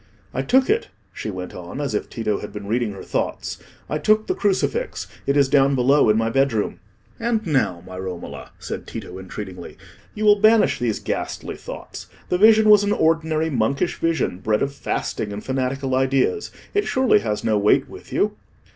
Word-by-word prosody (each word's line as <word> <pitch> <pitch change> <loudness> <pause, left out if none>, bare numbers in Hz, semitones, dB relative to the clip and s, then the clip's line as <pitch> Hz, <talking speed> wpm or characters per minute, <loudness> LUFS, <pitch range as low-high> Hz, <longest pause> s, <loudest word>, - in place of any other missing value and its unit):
"I - - -1
took 260 +1 +3
it," 440 +2 +1 0.3
she - - -5
went 95 -2 -6
on, 90 +9 -7
as 140 -5 -2
if 105 - -2
Tito 110 -3 -2
had 105 - -7
been 105 -1 -7
reading 115 0 -1
her 95 - -9
thoughts; - - -3 0.3
"I 150 - -2
took 215 +7 +3
the - - 0
crucifix; 360 - -1 0.2
it 140 +1 +2
is 140 -1 +5
down 135 0 +4
below 130 -1 +4
in 105 - +4
my 115 0 +1
bedroom." 135 -5 +1 0.4
"And 230 -1 0
now, 130 - 0
my 95 0 -8
Romola," 95 -2 -7
said - - -6
Tito, 95 - -7
entreatingly, 95 -2 -8 0.4
"you 215 - -2
will 205 -1 +5
banish 220 0 +5
these 115 -3 0
ghastly - - -4
thoughts. - - -9 0.2
The 180 - +1
vision 220 +1 +6
was 210 -1 +7
an 205 0 +1
ordinary 160 0 +1
monkish 130 +2 0
vision, 165 - 0
bred 105 +2 +1
of 140 0 -2
fasting 110 -5 -3
and 100 +1 -6
fanatical 130 0 -1
ideas. 135 - +1 0.2
It 410 0 +1
surely 260 -4 +3
has 105 - -2
no 110 -2 +2
weight 105 +1 +3
with - - -12
you." - - +1
135 Hz, 185 wpm, -22 LUFS, -, 0.4 s, was